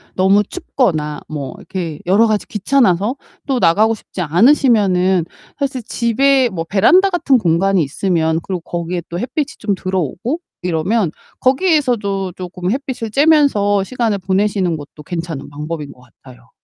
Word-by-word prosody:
너무 195 +2 +4
춥거나 160 - -2
뭐 145 -3 -5
이렇게 170 -5 -5
여러 200 +6 +4
가지 215 -2 -1
귀찮아서 210 -1 +1 0.3
또 270 -4 0
나가고 215 +5 +3
싶지 195 -3 -8
않으시면은 190 - +3 0.3
사실 270 -3 -2
집에 250 +3 +2
뭐 165 -3 -4
베란다 230 - +4
같은 340 -7 +2
공간이 190 -1 +2
있으면 160 +2 0
그리고 185 -2 -3
거기에 175 +1 -4
또 175 - -4
햇빛이 265 +6 -2
좀 210 -2 -1
들어오고 185 - -2 0.2
이러면 180 +2 0 0.3
거기에서도 250 - +1
쪼금 180 +1 -5
햇빛을 255 -3 -3
쬐면서 270 -9 +3
시간을 230 -4 -1
보내시는 190 -2 0
것도 150 +1 -12
괜찮은 165 -4 -5
방법인 150 0 -6
것 125 - -18 0.2
같아요. 125 -2 -16
195 Hz, 340 characters per minute, -17 LUFS, 170-240 Hz, 0.3 s, 너무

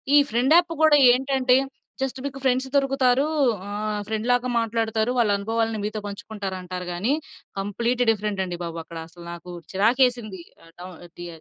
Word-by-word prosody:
ఈ - - +9
friend 250 +6 +2
app 345 0 +4
కూడా 310 -2 +6
ఏంటంటే 260 0 +2 0.5
జస్ట్ 265 -1 -2
మీకు 275 -1 -5
ఫ్రెండ్స్ 260 0 +1
దొరుకుతారు. 270 -1 +3 0.4
ఆహ్, 210 +1 -3
ఫ్రెండ్‌లాగా 245 +3 0
మాట్లాడుతారు. 225 0 0
వాళ్ళ 230 -4 +3
అనుభవాలను 225 +2 -1
మీతో 215 +1 -3
పంచుకుంటారంటారు 190 -4 -6
గాని, 210 +11 0 0.5
కంప్లీట్ 235 +5 0
డిఫరెంట్ 210 -2 -2
అండి 175 -1 -5
బాబు. 170 -1 -5
అక్కడ 165 - -10
అసలు 170 +1 -14
నాకు 175 +1 -10 0.2
చిరాకేసింది. 225 -1 +1 0.2
ఆహ్, 165 - -18
డౌ 180 - -7 0.3
డి 175 - -6
225 Hz, 145 wpm, -24 LUFS, 200-255 Hz, 0.5 s, ఈ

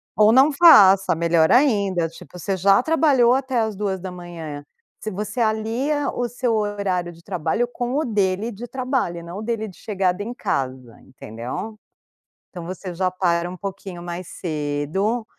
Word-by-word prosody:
Ou 210 +3 +5
não 265 +5 +6
faça, 195 - +7
melhor 165 -1 +2
ainda, 200 - +3
tipo, 165 +2 -13
você 190 +3 -2
já 195 +4 +4
trabalhou 280 -7 +4
até 260 -1 0
às 220 -2 -1
2h 175 -6 -5 0.4
se 215 - -5
você 210 +5 -4
alia 230 +7 0
o 245 -1 -2
seu 245 0 -1
horário 200 -4 -1
de 170 0 -17
trabalho 180 +6 -1
com 245 +1 -4
o 310 - 0
dele 205 -1 0
de 235 +5 -8
trabalho 255 -9 -2
e 170 - -8
não 170 +4 -7
o - - -6
dele 220 -1 -3
de 190 - -12
chegada 190 -2 -1
em 235 +3 -5
casa, 130 - -3
entendeu? 125 - -7 0.7
Então, 175 -3 -8
você 185 +1 -6
já 185 +1 0
para 175 -2 0
um 180 - -7
pouquinho 190 -2 -7
mais 175 +1 -6
cedo, 155 +8 -2
195 Hz, 165 wpm, -22 LUFS, 175-235 Hz, 0.7 s, faça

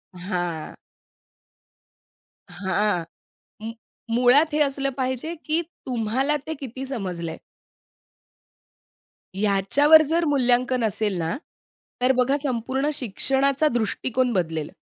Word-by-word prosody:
हां. 175 -3 -4 1.7
हां, 190 -2 0 0.6
मु 225 +1 -5 0.4
मुळात, 275 +6 +4
हे 305 - +1
असलं 275 -1 +1
पाहिजे, 260 +5 -2
की 315 +2 +1 0.2
तुम्हाला 255 +4 0
ते 315 - -2
किती 265 0 -6
समजलंय. 180 -10 -4 2.0
याच्यावर 210 +11 +5
जर 335 +1 +2
मूल्यांकन 255 -3 +2
असेल 210 -2 0
ना, 165 -1 -2 0.7
तर 255 +1 +4
बघा 255 +3 +2
संपूर्ण 265 +2 -1
शिक्षणाचा 270 +4 +1
दृष्टिकोन 245 +2 0
बदलेल. 160 -4 -1
250 Hz, 95 wpm, -24 LUFS, 200-275 Hz, 2.0 s, याच्यावर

